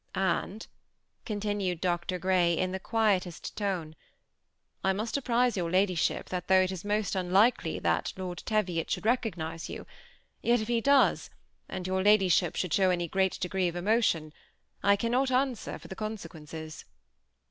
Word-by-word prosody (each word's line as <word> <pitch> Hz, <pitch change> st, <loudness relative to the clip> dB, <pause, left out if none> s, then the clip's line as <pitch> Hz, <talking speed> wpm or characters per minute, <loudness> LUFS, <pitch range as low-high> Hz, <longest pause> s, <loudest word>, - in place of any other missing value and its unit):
^ -, -, -1 dB
And," 190 Hz, +3 st, -1 dB, 0.6 s
continued 205 Hz, -5 st, -2 dB
Dr. 180 Hz, +1 st, -1 dB
Grey, 180 Hz, -2 st, +2 dB
in 185 Hz, 0 st, 0 dB
the 190 Hz, -, -3 dB
quietest 195 Hz, -5 st, 0 dB
tone, 190 Hz, -6 st, -2 dB
^ -, -, -16 dB, 0.9 s
I 190 Hz, -, +3 dB
must 215 Hz, +4 st, -3 dB
apprise 250 Hz, -3 st, +1 dB
your 175 Hz, -3 st, -1 dB
ladyship 185 Hz, -1 st, +1 dB
that 180 Hz, -1 st, -4 dB
though 190 Hz, 0 st, +6 dB
it 185 Hz, -, -1 dB
is 185 Hz, -2 st, -6 dB
most 205 Hz, 0 st, -1 dB
un 180 Hz, -2 st, -2 dB
likely 215 Hz, +6 st, +3 dB
that -, -, 0 dB
Lord 180 Hz, -2 st, -5 dB
Teviot 185 Hz, -7 st, -1 dB
should -, -, -2 dB
recognize 175 Hz, -9 st, -1 dB
you, -, -, -7 dB, 0.6 s
yet 235 Hz, -, +3 dB
that 230 Hz, -, 0 dB
if -, -, -7 dB
he 235 Hz, -1 st, +2 dB
does, 280 Hz, +2 st, +3 dB, 0.4 s
and 180 Hz, -, -5 dB
your 190 Hz, 0 st, 0 dB
ladyship 190 Hz, -4 st, +4 dB
should 180 Hz, -4 st, -2 dB
show 190 Hz, -2 st, +4 dB
any 175 Hz, -1 st, 0 dB
great 190 Hz, +2 st, 0 dB
de 180 Hz, -, -1 dB
gree 185 Hz, 0 st, 0 dB
of 170 Hz, -, -4 dB
emotion, 175 Hz, -5 st, +1 dB, 0.5 s
I 200 Hz, 0 st, +5 dB
cannot 245 Hz, +5 st, +1 dB
answer 255 Hz, -2 st, -1 dB
for -, -, -13 dB
the 190 Hz, -, -7 dB
consequences." 160 Hz, -8 st, -7 dB
190 Hz, 170 wpm, -29 LUFS, 180-215 Hz, 0.9 s, though